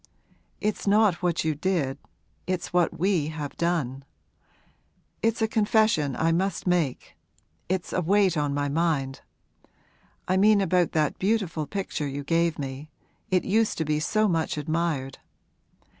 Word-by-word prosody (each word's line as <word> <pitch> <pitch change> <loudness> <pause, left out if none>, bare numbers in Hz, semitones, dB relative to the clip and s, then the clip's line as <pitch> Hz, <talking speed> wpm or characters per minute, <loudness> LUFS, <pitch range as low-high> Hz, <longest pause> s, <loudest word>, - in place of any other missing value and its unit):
'It's 210 0 -2
not 205 -3 +3
what 175 -2 0
you 160 -1 +1
did 150 -4 -1 0.5
it's 185 -1 -3
what 175 -1 +2
we 175 -4 +1
have 155 -2 -5
done. 155 -6 -1 1.2
It's 225 0 +1
a - - +3
confession 215 - +2
I 165 +1 +1
must 185 +2 -1
make 175 -8 -1 0.5
it's 185 -1 -2
a 185 - +1
weight 190 +1 +3
on 145 -2 0
my 145 0 -1
mind! 140 -3 -1 1.1
I 185 - +2
mean 210 +1 +5
about 180 -3 +1
that 155 -2 0
beautiful 190 -7 0
picture 190 -7 -3
you 140 +1 -5
gave 165 +2 +1
me 140 +2 -6 0.4
it 185 -1 +1
used 220 +2 +1
to 160 - -1
be 150 0 0
so 215 +7 +1
much 165 -4 0
admired. 150 -3 -2
170 Hz, 145 wpm, -26 LUFS, 150-195 Hz, 1.2 s, mean